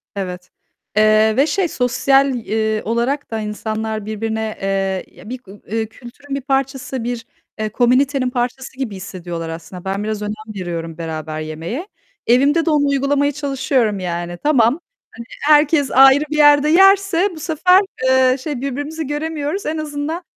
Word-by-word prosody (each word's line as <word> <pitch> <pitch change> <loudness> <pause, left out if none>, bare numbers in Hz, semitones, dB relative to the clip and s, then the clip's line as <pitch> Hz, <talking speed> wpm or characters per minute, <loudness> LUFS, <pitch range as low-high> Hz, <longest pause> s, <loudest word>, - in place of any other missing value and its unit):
Evet. 180 -2 -5 0.5
Eee, 215 0 +5
ve 280 +3 +4
şey, 385 +1 +1
sosyal, 270 +1 +2
iii, 220 -2 -1
olarak 235 +6 -1
da 225 - -2
insanlar 215 0 -4
birbirine, 220 0 -3
eee, 195 -1 -1
ya 185 +5 -12
bir 255 - -4
gu 190 - -14
ııı, 220 +2 -4
kültürün 245 +5 -9
bir 275 - -3
parçası, 270 -2 -2
bir, 235 -1 -4 0.3
eee, 215 0 -1
komünitenin 255 +3 +2
parçası 250 +1 -3
gibi 250 -7 -4
hissediyorlar 175 -3 -6
aslında. 170 +2 -9
Ben 195 +2 -2
biraz 215 -1 -3
önem 215 +1 -6
veriyorum 165 -2 -5
beraber 155 -2 -5
yemeğe. 165 - -5 0.4
Evimde 280 +7 +4
de - - +1
onu 295 -2 +3
uygulamaya 280 +1 +1
çalışıyorum, 270 -7 0
yani. 175 -1 -4
Tamam, 285 -6 +4 0.6
hani, 300 +5 +3
herkes 295 -1 +2
ayrı 270 +2 +6
bir 305 - -1
yerde 290 0 +6
yerse 390 +1 +5
bu 315 - -10
sefer, 360 +4 +4 0.2
eee, 260 0 +4
şey, 285 -2 -4
birbirimizi 290 +4 -4
göremiyoruz. 300 +4 -3
En 315 +1 -2
azından 305 +3 -4
250 Hz, 155 wpm, -19 LUFS, 210-290 Hz, 0.6 s, ayrı